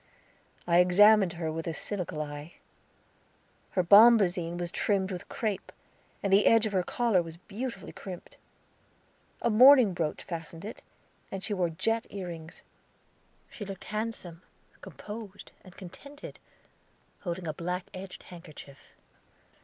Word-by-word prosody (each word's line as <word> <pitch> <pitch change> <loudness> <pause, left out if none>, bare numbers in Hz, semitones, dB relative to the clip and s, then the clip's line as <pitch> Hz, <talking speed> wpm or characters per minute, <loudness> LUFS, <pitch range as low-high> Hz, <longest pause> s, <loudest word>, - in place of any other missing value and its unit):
I 170 0 +4
examined 195 +1 +6
her 165 -2 -3
with 165 +1 -5
a 165 - -3
cynical 180 -6 -3
eye; 145 +2 -9 1.2
her 185 - +4
bombazine 190 -4 +6
was 175 -1 -4
trimmed 195 -1 0
with 180 -1 -7
crape, 210 -4 -3 0.5
and 200 -1 +1
the 200 +1 +5
edge 225 -1 +5
of 215 - -3
her 185 - +3
collar 220 0 +1
was 165 -1 -9
beautifully 225 +8 -6
crimped. 185 -3 -10 1.1
A 235 - +2
mourning 250 -2 +7
brooch 165 -3 -3
fastened 165 0 -7
it, 220 - -8 0.5
and 195 0 -5
she 210 - -1
wore 180 -3 0
jet 220 +7 -1
ear 190 -3 -6
rings. 160 -1 -9 0.9
She 215 - -8
looked 195 -2 -8
handsome, 210 -6 -4 0.4
composed, 210 -2 -9
and 185 -1 -16
contented, 280 +10 -11 0.8
holding 175 -1 -5
a 155 - -2
black 180 +2 -4
edged 185 0 -9
handkerchief. 155 -5 -13
185 Hz, 135 wpm, -29 LUFS, 170-210 Hz, 1.2 s, mourning